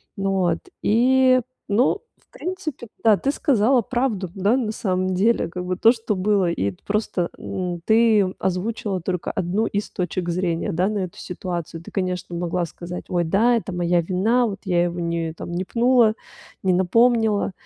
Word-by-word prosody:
Ну 195 Hz, -1 st, -1 dB
вот 175 Hz, -3 st, +1 dB, 0.2 s
и 255 Hz, +3 st, +4 dB, 0.3 s
ну, 245 Hz, -, +2 dB, 0.2 s
в -, -, -35 dB
принципе 345 Hz, -, -5 dB, 0.2 s
да, 220 Hz, -3 st, +5 dB
ты 275 Hz, -, 0 dB
сказала 250 Hz, -2 st, +3 dB
правду, 225 Hz, -6 st, -1 dB
да, 200 Hz, +6 st, +2 dB
на 230 Hz, -5 st, -1 dB
самом 185 Hz, -3 st, -1 dB
деле 205 Hz, +1 st, +2 dB
как 180 Hz, +2 st, -6 dB
бы 185 Hz, 0 st, -1 dB
то, 225 Hz, +5 st, +5 dB
что 225 Hz, -3 st, -2 dB
было, 195 Hz, -1 st, +2 dB
и 100 Hz, -, -1 dB
просто 200 Hz, -4 st, -1 dB
н 180 Hz, -2 st, -4 dB
ты 220 Hz, -2 st, +5 dB, 0.2 s
озвучила 190 Hz, +1 st, -2 dB
только 180 Hz, 0 st, -3 dB
1 190 Hz, +2 st, -1 dB
из 205 Hz, +1 st, -3 dB
точек 180 Hz, 0 st, -3 dB
зрения 175 Hz, +2 st, -1 dB
да 180 Hz, +2 st, +1 dB
на 210 Hz, -1 st, -1 dB
эту 180 Hz, -2 st, -5 dB
ситуацию. 170 Hz, -2 st, -5 dB
Ты, -, -, -11 dB
конечно, 180 Hz, -2 st, -3 dB
могла 175 Hz, 0 st, -1 dB
сказать: 175 Hz, +2 st, -8 dB
"Ой, 175 Hz, -1 st, +1 dB
да, 225 Hz, +9 st, +3 dB
это 205 Hz, -4 st, -3 dB
моя 175 Hz, 0 st, +2 dB
вина, 210 Hz, +8 st, +1 dB
вот 195 Hz, -3 st, -6 dB
я 175 Hz, -2 st, +2 dB
его 175 Hz, 0 st, -3 dB
не 170 Hz, -1 st, -2 dB
там 170 Hz, -, -8 dB
не 175 Hz, +2 st, -2 dB
пнула, 235 Hz, +1 st, +3 dB, 0.5 s
не 185 Hz, -1 st, +3 dB
напомнила." 220 Hz, +3 st, +3 dB
195 Hz, 175 wpm, -22 LUFS, 175-225 Hz, 0.5 s, да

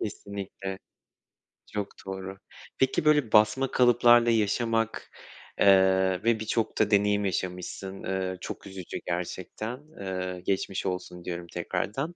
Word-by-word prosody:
Kesinlikle. 100 Hz, -2 st, -5 dB, 1.0 s
Çok 105 Hz, -1 st, -2 dB, 0.2 s
doğru. 95 Hz, 0 st, -6 dB, 0.4 s
Peki 130 Hz, +3 st, +2 dB
böyle 150 Hz, -7 st, +4 dB
basma 110 Hz, +6 st, +4 dB
kalıplarla 120 Hz, -1 st, +5 dB
yaşamak, 115 Hz, +1 st, 0 dB, 0.5 s
eee, 95 Hz, -1 st, +4 dB
ve 115 Hz, -1 st, +3 dB
birçok 110 Hz, +1 st, -1 dB
da 110 Hz, -1 st, +3 dB
deneyim 105 Hz, 0 st, +3 dB
yaşamışsın. 95 Hz, +1 st, -4 dB
Iıı 95 Hz, -1 st, -2 dB
çok -, -, -7 dB
üzücü 95 Hz, -2 st, -7 dB
gerçekten. 95 Hz, +7 st, -4 dB, 0.2 s
Eee, 95 Hz, -1 st, -4 dB
geçmiş 95 Hz, 0 st, -1 dB
olsun 90 Hz, -1 st, -4 dB
diyorum 85 Hz, -1 st, -5 dB
tekrardan. 105 Hz, -, -3 dB
100 Hz, 115 wpm, -28 LUFS, 95-115 Hz, 1.0 s, kalıplarla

